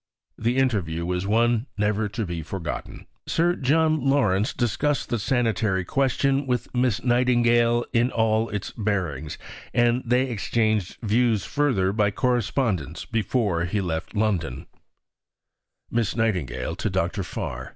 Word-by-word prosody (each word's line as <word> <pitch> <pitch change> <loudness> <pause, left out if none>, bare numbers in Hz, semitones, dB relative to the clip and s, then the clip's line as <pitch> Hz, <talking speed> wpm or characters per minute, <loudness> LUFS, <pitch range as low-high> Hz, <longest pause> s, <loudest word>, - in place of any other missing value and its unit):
The 120 +3 -1
interview 95 -11 0
was 90 +2 -2
one 115 +3 +2
never 105 0 0
to 105 +2 -3
be 85 -2 -4
forgotten." 80 0 -6 0.2
Sir 175 +2 +2
John 155 +1 +2
Lawrence 110 -8 +2
discussed 140 +5 -1
the 120 - 0
sanitary 110 -5 0
question 135 +3 +1
with 125 -2 -2
Miss 125 -5 +1
Nightingale 120 -1 +3
in 120 +1 +3
all 110 -1 +1
its 105 -2 -4
bearings, 90 - -2 0.4
and 120 +1 +3
they 125 +2 +2
exchanged 110 -3 0
views 110 -1 +2
further 120 -11 +1
by 105 -1 +2
correspondence 115 - -1
before 110 -6 0
he 105 +4 -1
left 85 0 -3
London: 100 - -1 1.3
(_Miss 115 -3 0
Nightingale 105 - -1
to - - -1
Dr. - - -1
Farr. 65 +1 -5
110 Hz, 130 wpm, -24 LUFS, 95-125 Hz, 1.3 s, Nightingale